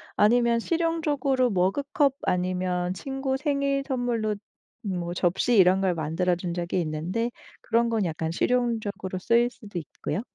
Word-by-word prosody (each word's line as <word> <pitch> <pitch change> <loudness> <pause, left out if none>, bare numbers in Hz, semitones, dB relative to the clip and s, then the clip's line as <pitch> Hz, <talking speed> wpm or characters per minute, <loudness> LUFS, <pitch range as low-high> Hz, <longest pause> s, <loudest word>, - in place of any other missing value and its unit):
아니면 235 +2 +4
실용적으로 295 -4 +1
머그컵 270 - +1
아니면 180 0 0
친구 270 +5 -3
생일 280 -1 0
선물로 240 -5 -1 0.5
뭐 175 -4 -3
접시 190 +8 +2
이런 190 0 +5
걸 185 -2 +1
만들어 165 +3 0
준 175 0 -4
적이 175 +1 -1
있는데 175 +9 -2 0.3
그런 235 0 +1
건 225 -4 +1
약간 160 -1 -2
실용적으로 215 -3 -1
쓰일 235 +5 +3
수도 210 -7 -7
있고요. 170 +5 -4
215 Hz, 305 characters per minute, -26 LUFS, 180-250 Hz, 0.5 s, 이런